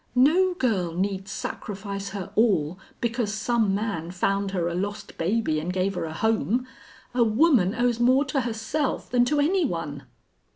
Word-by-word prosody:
No 350 +9 +4
girl 190 - 0
need 190 +1 -2
sacrifice 200 0 -5
her 195 -3 -6
all 185 -7 +2 0.2
because 235 -2 0
some 215 -1 +1
man 200 -6 -3
found 195 +2 0
her 180 -3 -1
a 170 - -2
lost 205 +3 -4
baby 175 -3 0
and 165 +4 -3
gave 185 +1 0
her 180 - -3
a 160 - -5
home. 225 +6 +1 0.5
A 245 -1 +4
woman 225 - +3
owes 240 -1 +1
more 255 +4 +4
to 275 -1 0
herself 240 +5 -2
than 245 0 +4
to 295 +4 +1
any 350 +6 +3
one." 165 - -4
210 Hz, 165 wpm, -25 LUFS, 185-245 Hz, 0.5 s, No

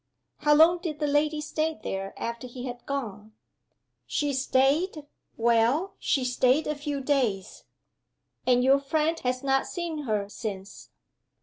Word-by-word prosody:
"How 295 0 +4
long 330 +3 +6
did 330 -4 -4
the 300 - -1
lady 295 +1 +1
stay 310 0 -2
there, 195 0 -4
after 235 +2 -5
he 245 +1 -8
had 245 -1 -7
gone?" 215 -6 -5 0.7
"She 290 -1 -1
staid 280 +5 +1 0.3
well, 235 +10 +2
she 265 -3 0
staid 255 +4 +2
a 300 - -1
few 290 -1 -4
days." 255 -9 -1 0.8
"And 250 -1 +4
your 270 +2 +5
friend 315 +3 0
has 255 +1 -2
not 270 0 +1
seen 330 -4 -4
her 210 -3 -1
since?" 200 -2 -7
275 Hz, 140 wpm, -27 LUFS, 240-300 Hz, 0.8 s, long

